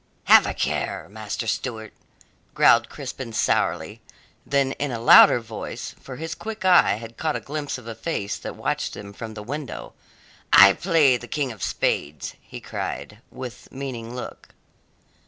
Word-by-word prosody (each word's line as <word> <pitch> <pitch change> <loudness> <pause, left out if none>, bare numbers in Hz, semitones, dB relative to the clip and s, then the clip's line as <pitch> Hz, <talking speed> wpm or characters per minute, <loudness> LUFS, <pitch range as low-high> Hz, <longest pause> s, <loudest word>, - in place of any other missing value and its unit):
"Have - - +7
a - - -3
care, - - -2
Master 110 +2 -5
Stewart," 110 -1 -3 0.6
growled - - +5
Crispin 120 -4 -7
sourly, - - 0 0.5
then 140 -1 +2
in 145 - -1
a 120 - -3
louder 120 +1 +8
voice 115 -2 -7
for 130 - -9
his 160 +4 -5
quick 215 +2 -7
eye 180 - +6
had 115 +1 -10
caught 155 -2 -1
a - - -1
glimpse 145 -1 -4
of 125 - -13
a 115 - -6
face 105 -7 -3
that - - -7
watched - - -2
them 100 0 -9
from 110 +1 -8
the 105 - -7
window 120 - -6 0.6
"I 100 +1 +9
play 155 - +3
the 120 - -11
King 140 -2 -2
of 110 - -12
Spades!" 75 -1 -2
he - - -10
cried, - - -6
with 125 -2 -9
meaning 125 -3 -6
look. 125 - -9
120 Hz, 160 wpm, -24 LUFS, 110-145 Hz, 0.6 s, I